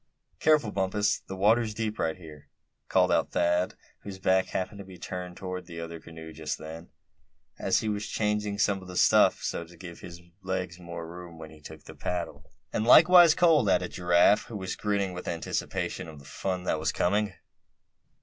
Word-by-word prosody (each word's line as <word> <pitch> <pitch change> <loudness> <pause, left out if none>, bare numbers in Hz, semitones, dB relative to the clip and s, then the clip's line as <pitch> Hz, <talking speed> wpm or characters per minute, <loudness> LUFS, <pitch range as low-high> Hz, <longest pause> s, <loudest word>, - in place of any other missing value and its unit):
"Careful, 150 -8 +3
Bumpus, 100 +2 0
the 95 - -6
water's 110 +3 +2
deep 110 -1 -3
right 80 +1 -1
here!" 75 -4 -13 0.4
called - - +3
out - - +2
Thad, 90 +1 +1 0.2
whose 100 -2 -8
back 95 0 +2
happened 100 +2 -4
to - - -7
be 95 -1 -13
turned 90 0 -6
toward 90 -2 -6
the 85 -2 -8
other 85 0 -6
canoe 80 0 -11
just 80 -1 -4
then, 80 +2 -9 0.7
as - - +1
he 110 - -3
was 105 0 -2
changing 105 -1 -1
some 100 -1 +1
of 95 - -12
the 90 -1 -7
stuff, - - +4
so - - -2
as 85 - -11
to 90 - -16
give 85 -1 -10
his 85 0 -10 0.2
legs 95 -1 -4
more 85 -1 -7
room 85 0 -10
when 80 -1 -10
he 80 -1 -16
took 80 0 -11
the - - -11
paddle. 90 -1 -5 0.2
"And - - 0
likewise 165 +6 +8
cold!" 160 - +4
added 90 -1 +1
Giraffe, 90 +3 +3
who 110 - -7
was 95 -2 -4
grinning 100 -3 -1
with 90 - -7
anticipation 85 0 -3
of 80 -2 -10
the 70 - -14
fun 90 +3 -3
that 80 - 0
was 80 +1 0
coming. 105 +2 0
90 Hz, 195 wpm, -28 LUFS, 85-105 Hz, 0.7 s, likewise